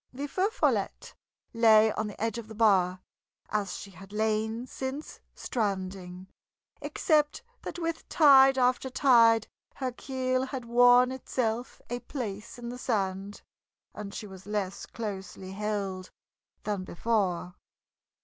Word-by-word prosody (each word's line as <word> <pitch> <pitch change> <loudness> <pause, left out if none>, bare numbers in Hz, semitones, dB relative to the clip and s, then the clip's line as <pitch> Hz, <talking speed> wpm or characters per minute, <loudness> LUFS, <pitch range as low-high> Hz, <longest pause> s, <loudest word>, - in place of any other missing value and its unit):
The 275 +3 -5
Feu 370 +8 0
Follette - - -1 0.4
lay 220 -1 +6
on 215 0 -2
the 210 - -9
edge 225 +1 -1
of 225 - -9
the 220 - -10
bar, 185 -4 +3 0.5
as 200 -4 -1
she 200 - -9
had 190 +2 -13
lain 220 +2 -1
since 265 +3 -6 0.2
stranding, 190 -4 -3 0.6
except 300 -2 +1 0.2
that - - -6
with 330 -1 -4
tide 270 -3 +7
after 255 +1 +2
tide 230 -4 +5 0.3
her 260 -2 -2
keel 255 0 -1
had 260 -3 -5
worn 245 +1 +6
itself 245 -2 -3
a 245 +1 -3
place 230 -5 -6
in 240 -1 -6
the 250 +1 -7
sand, 200 -4 -2 0.5
and 205 -1 -7
she 210 - -6
was 190 -1 -12
less 205 -3 -3
closely 195 -4 -6
held 195 -2 -3 0.5
than 205 -3 -2
before. 185 -2 -1
220 Hz, 130 wpm, -29 LUFS, 200-255 Hz, 0.6 s, tide